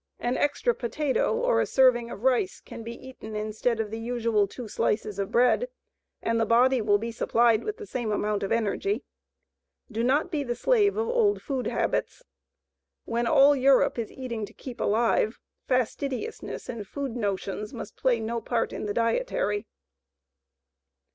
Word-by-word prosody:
An 240 Hz, +1 st, -1 dB
extra 455 Hz, +12 st, +1 dB
potato 290 Hz, -, 0 dB
or -, -, +2 dB
a -, -, 0 dB
serving 250 Hz, -3 st, +4 dB
of 220 Hz, -, -8 dB
rice 250 Hz, -8 st, +2 dB
can -, -, -10 dB
be 230 Hz, +1 st, -6 dB
eaten 220 Hz, -4 st, -9 dB
instead 215 Hz, +2 st, -1 dB
of 215 Hz, -2 st, -2 dB
the 225 Hz, -, -4 dB
usual 230 Hz, -3 st, +1 dB
two 240 Hz, +3 st, -8 dB
slices 210 Hz, -1 st, -1 dB
of 195 Hz, -, -2 dB
bread 250 Hz, -, +3 dB, 0.5 s
and 230 Hz, 0 st, +1 dB
the -, -, +3 dB
body 250 Hz, +2 st, +4 dB
will 205 Hz, -1 st, +3 dB
be 230 Hz, +3 st, -4 dB
supplied 230 Hz, 0 st, +2 dB
with 430 Hz, +1 st, -4 dB
the 425 Hz, -, -8 dB
same 240 Hz, -, -3 dB
amount 210 Hz, 0 st, 0 dB
of 195 Hz, -, -3 dB
energy. 230 Hz, -, 0 dB, 0.9 s
Do 225 Hz, +1 st, -1 dB
not 285 Hz, +8 st, +2 dB
be 300 Hz, -4 st, -1 dB
the 240 Hz, -3 st, -2 dB
slave 415 Hz, -, +3 dB
of 450 Hz, +1 st, 0 dB
old 465 Hz, -4 st, +2 dB
food 265 Hz, -3 st, -2 dB
habits. -, -, -1 dB, 0.8 s
WHEN 235 Hz, +1 st, -1 dB
ALL 280 Hz, +4 st, +6 dB
EUROPE 270 Hz, -2 st, +4 dB
IS 225 Hz, -, -3 dB
EATING 235 Hz, -4 st, -5 dB
TO -, -, -16 dB
KEEP 250 Hz, -3 st, -8 dB
ALIVE, 220 Hz, +1 st, +2 dB, 0.3 s
FASTIDIOUSNESS 265 Hz, -, -2 dB
AND 220 Hz, -4 st, -6 dB
FOOD 275 Hz, 0 st, -4 dB
"NOTIONS" 205 Hz, -1 st, -3 dB
MUST 210 Hz, -, -8 dB
PLAY 245 Hz, -3 st, +2 dB
NO 230 Hz, +1 st, -3 dB
PART 230 Hz, -1 st, -1 dB
IN -, -, -4 dB
THE 205 Hz, -, -3 dB
DIETARY. 230 Hz, -, 0 dB
235 Hz, 165 wpm, -27 LUFS, 220-270 Hz, 0.9 s, ALL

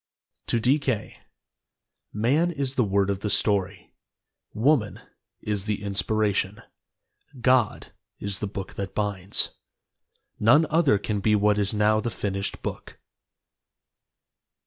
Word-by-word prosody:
(To 115 Hz, -, +1 dB
D. 130 Hz, +6 st, +3 dB
K.) 130 Hz, -7 st, -3 dB, 0.9 s
Man 135 Hz, +11 st, +2 dB
is 140 Hz, -5 st, -2 dB
the 130 Hz, -, +2 dB
word 100 Hz, -1 st, +1 dB
of 100 Hz, -, -3 dB
the 105 Hz, -, -3 dB
story, 100 Hz, -2 st, -1 dB, 0.6 s
Woman 120 Hz, -2 st, +1 dB, 0.4 s
is 105 Hz, -2 st, -2 dB
the 105 Hz, -1 st, -2 dB
inspiration, 105 Hz, +1 st, -1 dB, 0.8 s
God 125 Hz, -2 st, +1 dB, 0.2 s
is 100 Hz, 0 st, -3 dB
the 105 Hz, -, -2 dB
book 95 Hz, -1 st, -6 dB
that 100 Hz, -1 st, -6 dB
binds, 100 Hz, -2 st, -1 dB, 0.9 s
None 145 Hz, +9 st, +5 dB
other 155 Hz, -9 st, +4 dB
can 105 Hz, +1 st, -2 dB
be 105 Hz, +2 st, +2 dB
what 105 Hz, 0 st, +3 dB
is 100 Hz, -1 st, +1 dB
now 105 Hz, 0 st, +2 dB
the 120 Hz, -, -2 dB
finished 100 Hz, -1 st, -4 dB
book. -, -, -6 dB
105 Hz, 125 wpm, -25 LUFS, 100-120 Hz, 0.9 s, None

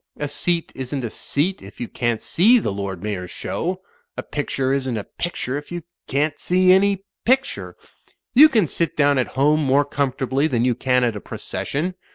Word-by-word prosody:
A 145 Hz, -, -2 dB
seat 170 Hz, +4 st, -1 dB
isn't 130 Hz, +1 st, -4 dB
a 115 Hz, -, -3 dB
seat 175 Hz, +7 st, -1 dB
if 100 Hz, -, -13 dB
you 120 Hz, -, -3 dB
can't 120 Hz, -2 st, -2 dB
see 220 Hz, +9 st, +5 dB
the 215 Hz, -, -1 dB
Lord 100 Hz, -2 st, -5 dB
Mayor's 95 Hz, -4 st, -3 dB
Show. 175 Hz, -, -3 dB, 0.4 s
A -, -, -3 dB
picture 135 Hz, -2 st, -1 dB
isn't 130 Hz, -4 st, -1 dB
a 105 Hz, -, -3 dB
pictiu 170 Hz, -, -4 dB
e -, -, 0 dB
if 145 Hz, -, -15 dB
you 175 Hz, -1 st, -5 dB, 0.2 s
can't 145 Hz, +2 st, 0 dB
see 185 Hz, +1 st, +3 dB
any 195 Hz, 0 st, +3 dB, 0.2 s
picttwe. 265 Hz, +3 st, 0 dB, 0.6 s
You 300 Hz, +5 st, +9 dB
can 220 Hz, -, +3 dB
sit 165 Hz, +1 st, -2 dB
down 145 Hz, -2 st, +4 dB
at 125 Hz, -, +1 dB
home 150 Hz, +3 st, +3 dB
more 140 Hz, +1 st, +3 dB
comfortably 135 Hz, 0 st, 0 dB
than 120 Hz, -5 st, +1 dB
you 125 Hz, -, +3 dB
can 125 Hz, +1 st, +1 dB
at 120 Hz, -3 st, +1 dB
a 105 Hz, -, -6 dB
proces -, -, -6 dB
sion. 165 Hz, +6 st, -1 dB
140 Hz, 200 wpm, -22 LUFS, 125-175 Hz, 0.6 s, You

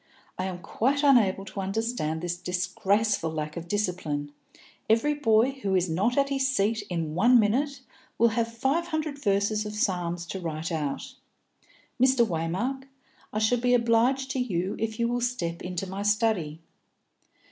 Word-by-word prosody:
I 185 Hz, -, -1 dB
am 185 Hz, -2 st, -4 dB
quite 280 Hz, -, 0 dB
unable 215 Hz, -9 st, +4 dB
to 195 Hz, +1 st, -7 dB
understand 195 Hz, -6 st, -2 dB
this 175 Hz, 0 st, -2 dB
disgraceful 190 Hz, +2 st, 0 dB
lack 155 Hz, -1 st, -4 dB
of 170 Hz, 0 st, -6 dB
discipline. 170 Hz, -7 st, -2 dB, 0.6 s
Every 230 Hz, +7 st, +3 dB
boy 235 Hz, -3 st, +3 dB
who 195 Hz, -1 st, 0 dB
is 180 Hz, -2 st, +1 dB
not 210 Hz, -, +1 dB
at 275 Hz, 0 st, +3 dB
his 270 Hz, -1 st, +1 dB
seat 220 Hz, -3 st, +1 dB
in 165 Hz, -4 st, -2 dB
one 235 Hz, +8 st, +5 dB
minute 265 Hz, +6 st, +1 dB, 0.4 s
will 235 Hz, +1 st, +5 dB
have 230 Hz, 0 st, -1 dB
five 270 Hz, +9 st, 0 dB
hundred 310 Hz, -3 st, -3 dB
verses 205 Hz, 0 st, +1 dB
of 210 Hz, 0 st, -6 dB
the -, -, -6 dB
Psalms 175 Hz, -5 st, -1 dB
to 190 Hz, +3 st, -5 dB
write 165 Hz, 0 st, -4 dB
out! 150 Hz, -4 st, -3 dB, 0.9 s
Mr. 260 Hz, -2 st, +5 dB
Waymark, 190 Hz, +10 st, -2 dB, 0.5 s
I -, -, -4 dB
shall 220 Hz, +3 st, +2 dB
be 245 Hz, +1 st, +3 dB
obliged 245 Hz, +3 st, +2 dB
to 265 Hz, -, -2 dB
you 190 Hz, -6 st, -1 dB
if 220 Hz, 0 st, -3 dB
you 235 Hz, -, +2 dB
will 245 Hz, +1 st, -1 dB
step 175 Hz, -9 st, -2 dB
into 180 Hz, +1 st, -4 dB
my 190 Hz, +1 st, -5 dB
study." 205 Hz, -7 st, 0 dB
210 Hz, 165 wpm, -27 LUFS, 180-245 Hz, 0.9 s, one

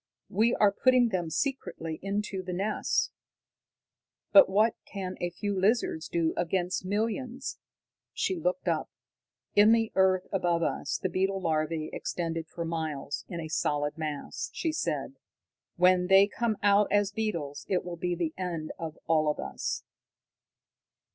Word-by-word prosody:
"We 225 Hz, +5 st, +3 dB
are 205 Hz, -1 st, +4 dB
putting 250 Hz, +3 st, +4 dB
them 180 Hz, -5 st, -1 dB
secretly 165 Hz, -, -3 dB
into 200 Hz, 0 st, -2 dB
the 180 Hz, -1 st, -5 dB
nests. 200 Hz, +4 st, 0 dB, 1.2 s
But 290 Hz, -, +8 dB
what 215 Hz, +4 st, +3 dB
can 185 Hz, -2 st, -5 dB
a 175 Hz, -, 0 dB
few 200 Hz, +4 st, -3 dB
lizards 190 Hz, -4 st, +1 dB
do 165 Hz, -1 st, +1 dB
against 180 Hz, +1 st, -1 dB
millions." 230 Hz, +6 st, -2 dB, 0.5 s
She 370 Hz, -, -1 dB
looked 275 Hz, -3 st, -1 dB
up. -, -, 0 dB, 0.7 s
"In 210 Hz, +2 st, +7 dB
the 225 Hz, -1 st, +2 dB
earth 190 Hz, -1 st, +3 dB
above 175 Hz, -3 st, +1 dB
us, -, -, -1 dB
the -, -, -1 dB
beetle 190 Hz, +1 st, 0 dB
larvae 155 Hz, -2 st, -1 dB
extend 165 Hz, -1 st, -3 dB
for 170 Hz, +1 st, -5 dB
miles, 155 Hz, -4 st, -3 dB
in 170 Hz, -, -5 dB
a 160 Hz, -, -4 dB
solid 145 Hz, -2 st, 0 dB
mass," 155 Hz, -3 st, -4 dB
she 325 Hz, -, -1 dB
said. 310 Hz, -, -2 dB, 0.6 s
"When 180 Hz, 0 st, +4 dB
they 195 Hz, +1 st, +7 dB
come 220 Hz, +1 st, -1 dB
out 205 Hz, 0 st, +4 dB
as 205 Hz, 0 st, +3 dB
beetles, 170 Hz, -10 st, -3 dB
it 185 Hz, -2 st, +1 dB
will 175 Hz, -1 st, -5 dB
be 175 Hz, +1 st, -2 dB
the 165 Hz, -2 st, -2 dB
end 170 Hz, -4 st, -3 dB
of 165 Hz, -1 st, -5 dB
all 155 Hz, -2 st, +3 dB
of 150 Hz, -, -1 dB
us." -, -, -4 dB
185 Hz, 150 wpm, -29 LUFS, 165-210 Hz, 1.2 s, But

